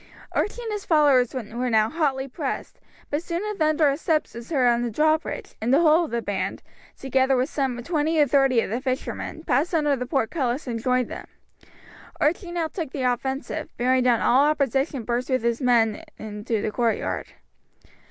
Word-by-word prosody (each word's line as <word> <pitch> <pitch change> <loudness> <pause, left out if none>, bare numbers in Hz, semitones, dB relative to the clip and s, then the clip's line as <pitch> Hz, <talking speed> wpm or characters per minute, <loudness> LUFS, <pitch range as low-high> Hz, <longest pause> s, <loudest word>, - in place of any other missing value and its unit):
Archie 480 +3 -2
and 450 - -4
his 415 -2 -3
followers 280 -6 +3
were 245 +1 -3
now 220 -2 +3
hotly 275 -2 -1
pressed, 275 +1 -5 0.3
but 290 +2 0
soon 345 +2 -3
a - - -5
thunder 310 -3 +3
of 280 +1 0
steps 320 -2 0
was 235 0 -9
heard 275 -6 +2
on 240 0 +3
the 240 - -1
drawbridge, 310 +7 0
and 230 +3 0
the 280 +5 +5
whole 325 +1 +5
of - - -8
the 235 -1 -2
band, 205 -1 -3 0.3
together 265 0 +2
with 255 +4 0
some 260 -4 -2
twenty 315 +1 0
or 295 - +6
thirty 270 -3 +3
of - - -4
the 240 +3 -2
fishermen, 265 +4 -4
passed 310 +5 +1
under 295 -3 +2
the 250 -1 -5
portcullis 260 0 -1
and 230 -3 -4
joined 250 0 +1
them. - - -8 0.9
Archie 345 +4 0
now 340 -2 -1
took 320 -2 -5
the 265 -1 -4
offensive, 265 +3 -1
and - - -43
bearing 255 +1 +2
down 245 -2 +3
all 265 +4 +4
opposition 275 -2 0
burst 240 +3 -2
with 255 -3 +1
his 235 +2 0
men 230 -4 +3 0.2
into 215 +1 -3
the 215 - -1
courtyard. 230 -1 -1
265 Hz, 190 wpm, -24 LUFS, 240-305 Hz, 0.9 s, or